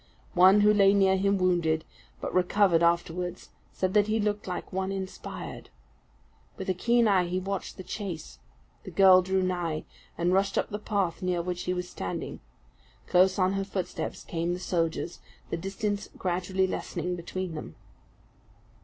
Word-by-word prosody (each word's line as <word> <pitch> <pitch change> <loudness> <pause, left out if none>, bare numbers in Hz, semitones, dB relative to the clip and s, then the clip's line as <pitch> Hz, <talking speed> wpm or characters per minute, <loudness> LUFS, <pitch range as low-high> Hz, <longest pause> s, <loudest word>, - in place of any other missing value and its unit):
One 190 +3 +7
who 210 +1 +6
lay 200 -1 +5
near 190 -1 +4
him 195 +1 +2
wounded, 170 -4 +1 0.4
but - - -4
recovered 185 -1 +3
afterwards, 170 +1 0 0.2
said 185 0 -1
that 210 0 +4
he 220 +1 +1
looked 205 -1 -1
like 180 0 -5
one 190 +1 -1
inspired. 190 -1 -6 0.9
With 190 - -6
a - - +1
keen 235 +5 +3
eye 190 -3 +4
he 180 +1 -1
watched 195 +1 -4
the 185 - -7
chase. 180 -4 -6 0.4
The - - -8
girl 190 -2 +7
drew 190 +1 0
nigh; 175 -4 -2 0.3
and 175 +2 +1
rushed 195 +1 +2
up - - 0
the 210 - -3
path 200 -4 -1
near 180 -2 0
which 180 0 -4
he 180 - 0
was 180 0 -3
standing. 90 - -5 0.7
Close 185 +1 +4
on 185 0 +2
her 195 0 -1
footsteps 195 -2 -4
came 170 +1 -2
the - - -7
soldiers, 170 -1 -2 0.3
the - - +1
distance 200 +3 -3
gradually 185 +1 0
lessening 180 -1 -3
between 180 +1 -5
them. 155 - -7
185 Hz, 160 wpm, -28 LUFS, 175-195 Hz, 0.9 s, One